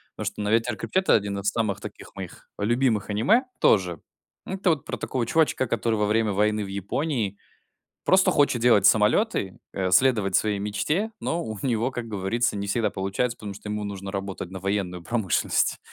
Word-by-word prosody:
Потому 110 - -5
что, 100 +1 -3
ну, 105 - -1
"Ветер 115 +2 +2
крепчает"- 190 0 -1
это - - +7
1 100 -2 -1
из 100 - +1
самых 110 -4 -1
таких - - -10
моих - - -9
любимых 115 -1 +1
аниме 205 - +3
тоже. 90 -5 +3 0.4
Это 190 -2 0
вот 145 -5 -2
про - - -4
такого 125 -3 -2
чувачка, 130 0 +2
который 115 0 0
во 105 -1 +1
время 110 0 +1
войны 105 +1 +1
в 100 - -6
Японии 100 - -2 0.7
просто 190 0 +5
хочет 140 -5 +2
делать 110 -5 +5
самолеты, 105 - +2 0.2
э, 95 -1 -1
следовать 105 -2 +3
своей 105 -2 +1
мечте. 150 - -1
Но 170 +1 -1
у 110 -1 -5
него, 120 -1 0
как 120 -3 -5
говорится, 105 +3 -1
не 100 0 -3
всегда 105 +2 0
получается, 100 +6 -2
потому 105 -2 -6
что 105 +1 -9
ему 105 0 -3
нужно 100 -1 -5
работать 95 -2 -5
на 95 - -6
военную 95 -2 -2
промышленность. 100 -3 0
105 Hz, 185 wpm, -25 LUFS, 100-120 Hz, 0.7 s, это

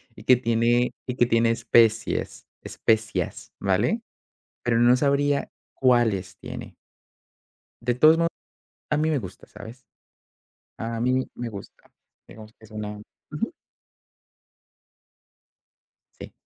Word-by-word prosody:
y 105 - -13
que 125 - +6
tiene 120 +1 +2 0.2
y 125 - -3
que 120 - +4
tiene 115 -1 +3
especies 115 -1 +1 0.2
especias, 110 -6 -1
¿vale? - - +1 0.6
Pero 115 -1 +1
no 120 +1 +6
sabría 140 +1 +1 0.2
cuáles 110 -7 +1
tiene. - - -9 1.1
De 120 0 0
todos 155 +4 +6
mod 170 0 +2 0.6
a 150 - +2
mí 155 +1 +1
me 150 -3 +1
gusta, 95 -6 -9
¿sabes? 125 +3 -12 0.9
A 115 0 -3
mí 130 +1 +1
me 120 -1 -5
gusta. 100 -2 -12 0.3
Digamos 110 0 -13
que - - -24
es 110 - -16
una 105 -1 -6 0.3
Ujú. - - -3 2.7
Sí. - - -9
115 Hz, 115 wpm, -25 LUFS, 110-125 Hz, 2.7 s, que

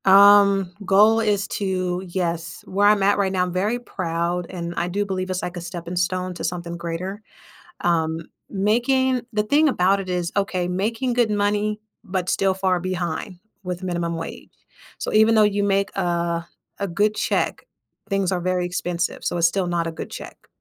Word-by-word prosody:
Um, 200 -1 +6
goal 210 +4 +5
is 210 -2 +1
to 185 -2 -1
yes. 170 -2 -3
Where 200 +2 +2
I'm 205 -1 +4
at 200 +1 +4
right 195 -1 +1
now, 185 -1 +1
I'm 180 -1 -3
very 205 +6 0
proud, 170 -5 -2
and 170 -2 -5
I 175 - -1
do 200 +3 -1
believe 185 -1 -3
it's 185 0 -2
like 180 0 -4
a - - -4
stepping 175 0 -6
stone 180 +1 -1
to - - -6
something 170 0 -3
greater. 175 +4 -5 0.6
Um, 160 -1 +1 0.3
making 245 +6 +2
the 210 -2 +1
thing 295 +8 +4
about 195 -4 +2
it 190 -1 -6
is, 175 -2 -1
okay, 185 -3 0
making 225 +8 -1
good 240 -2 +2
money, 210 +1 0 0.2
but 185 -3 -2
still 195 -1 +2
far 185 -1 +1
behind 180 +1 -3 0.2
with 180 0 -5
minimum 170 -2 -2
wage. 165 0 -7 0.5
So, - - -4
even 220 +1 +5
though 215 - +6
you 205 -1 +2
make 200 0 +1
a 170 -1 -1 0.3
a 200 - -1
good 205 +4 +1
check, - - -1 0.4
things 195 -2 +1
are 180 -1 0
very 180 0 0
expensive. 175 -1 -2
So, 175 - -1
it's 170 0 +5
still 185 +1 -1
not 170 -1 0
a - - -3
good 160 - -7
check. - - -10
185 Hz, 185 wpm, -23 LUFS, 175-205 Hz, 0.6 s, Um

